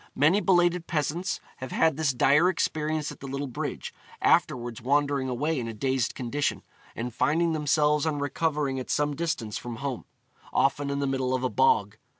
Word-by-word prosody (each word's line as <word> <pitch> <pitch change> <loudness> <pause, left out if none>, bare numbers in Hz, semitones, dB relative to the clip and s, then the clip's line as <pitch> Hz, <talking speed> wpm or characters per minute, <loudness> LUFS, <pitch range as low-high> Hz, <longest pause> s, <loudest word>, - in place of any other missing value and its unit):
Many 160 +9 +4
belated 175 -3 +2
peasants 165 +3 -1 0.2
have 130 -1 -7
had 160 -3 +3
this 155 -2 +1
dire 145 +7 +4
experience 155 -3 -1
at - - -12
the 135 - -8
little 140 +1 -3
bridge, 125 - -5 0.3
afterwards 120 -2 +1
wandering 140 +1 +1
away 145 +5 -1
in 115 - -4
a 115 - -6
dazed 130 +1 0
condition, 140 +3 -2 0.3
and 120 +1 -4
finding 165 +6 +1
themselves 150 0 +2
on 150 -2 0
recovering 145 -1 -1
at 130 - -7
some 145 0 0
distance 135 -10 -2
from 120 -1 -6
home, 135 0 -4 0.5
often 140 +2 +1
in 140 - -1
the - - +1
middle 130 -1 0
of 130 - -3
a 130 - +1
bog. 460 -1 +2
145 Hz, 175 wpm, -27 LUFS, 130-155 Hz, 0.5 s, Many